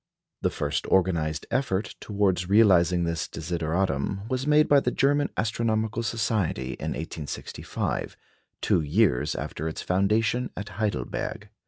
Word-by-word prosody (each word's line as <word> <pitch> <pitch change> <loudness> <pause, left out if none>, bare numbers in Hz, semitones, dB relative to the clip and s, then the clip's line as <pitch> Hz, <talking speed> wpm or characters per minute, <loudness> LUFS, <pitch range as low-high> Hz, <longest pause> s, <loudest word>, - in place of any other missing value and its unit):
The - - +2
first 75 0 -2
organised 85 -5 +1
effort 110 -6 0
towards 95 -3 0
realising 90 -5 +5
this 85 -1 -1
desideratum 85 +1 -1
was 130 +2 -1
made 150 0 +5
by 145 - +6
the 125 - 0
German 145 +3 +2
Astronomical 110 0 0
Society 110 - -1
in - - -2
1865, 80 -1 -4 0.4
two - - +2
years 75 - +2
after 80 - -4
its 80 - -4
foundation 105 +6 +1
at 100 +1 -5
Heidelberg. 105 0 -3
100 Hz, 125 wpm, -26 LUFS, 85-115 Hz, 0.4 s, by